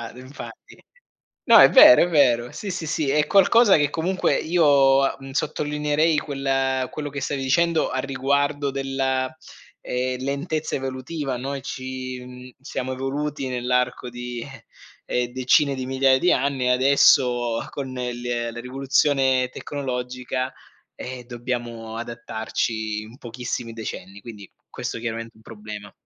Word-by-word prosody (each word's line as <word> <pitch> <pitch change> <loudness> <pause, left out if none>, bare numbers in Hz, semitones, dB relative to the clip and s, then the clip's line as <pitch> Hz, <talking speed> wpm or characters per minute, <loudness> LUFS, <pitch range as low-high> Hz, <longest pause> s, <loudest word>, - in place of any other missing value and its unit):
infatti. 130 +3 -12 0.6
No, - - +7
è - - +9
vero, 310 0 +9
è 175 - 0
vero. 125 -7 +3
Sì, 205 - -6
sì, 165 - -4
sì, 150 -2 -1
è 150 +2 +2
qualcosa 205 +1 +5
che 145 -1 +2
comunque 175 +5 0
io, 140 -5 +3
uhm, 135 0 -10
sottolineerei 150 +3 0
quel 135 -2 -1
quello 150 -1 -5
che 140 -1 -6
stavi 140 -2 -2
dicendo 160 +5 +2
a 130 - -2
riguardo 140 +2 0
della, 135 -1 -1 0.5
ehm, 125 0 -2
lentezza 150 +3 -2
evolutiva. 135 +1 -4
Noi 135 +2 -4
ci, 130 0 -6
mhmm, 125 0 -11
siamo 130 -1 -4
evoluti 135 +2 -3
nell'arco 125 0 -1
di 120 -1 -6 0.6
eh, 125 0 -1
decine 130 +3 +2
di 130 -1 -4
migliaia 130 0 +3
di 180 - +3
anni 135 -2 +1
adesso 125 -2 +3
con 135 -2 -6
l 120 -1 -3
la 120 - -8
rivoluzione 130 0 +1
tecnologica, 130 -2 -4 0.4
ehm, 125 -1 -7
dobbiamo 120 -2 -5
adattarci 110 -2 -3
in 110 +3 -12
pochissimi 120 -2 -5
decenni, 100 -3 -7
quindi 105 -5 -11 0.2
questo - - -5
chiaramente 115 0 -5
è - - -41
un 110 - -20
problema. 105 -2 -9
130 Hz, 135 wpm, -23 LUFS, 125-140 Hz, 0.6 s, è